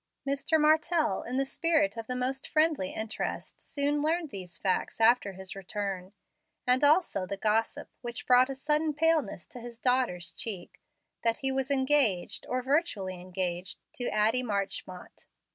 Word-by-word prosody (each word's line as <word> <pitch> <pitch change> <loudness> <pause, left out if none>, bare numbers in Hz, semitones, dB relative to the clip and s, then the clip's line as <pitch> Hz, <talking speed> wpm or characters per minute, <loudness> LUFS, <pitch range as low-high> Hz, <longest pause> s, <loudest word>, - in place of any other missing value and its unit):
Mr. 280 +3 +2
Martell, 310 +1 +3
in 250 +2 -4
the 275 - +2
spirit 315 0 +1
of 225 -1 -6
the 250 - -2
most 260 +2 -2
friendly 310 - +2
interest, 220 0 -5
soon 290 +1 -1
learned 320 +1 0
these 185 -4 -7
facts 190 +2 -1
after 225 -3 +4
his 190 +1 -9
return, 195 -1 -4 0.5
and 250 +2 +3
also 290 - +3
the 200 - -4
gossip, 220 +2 0
which 240 -1 -6
brought 255 +1 +5
a 270 - -3
sudden 300 +2 0
paleness 300 - +1
to 245 - -10
his 235 0 -9
daughter's 245 -8 +1
cheek, 195 -6 -6 0.4
that 230 -1 +2
he 270 - +4
was 265 0 -1
engaged, 265 -9 +2
or 255 0 -1
virtually 215 - 0
engaged, 180 0 -3 0.2
to 245 - -3
Addie 220 +4 +2
Marchmont. 200 -5 -4
250 Hz, 155 wpm, -29 LUFS, 200-290 Hz, 0.5 s, brought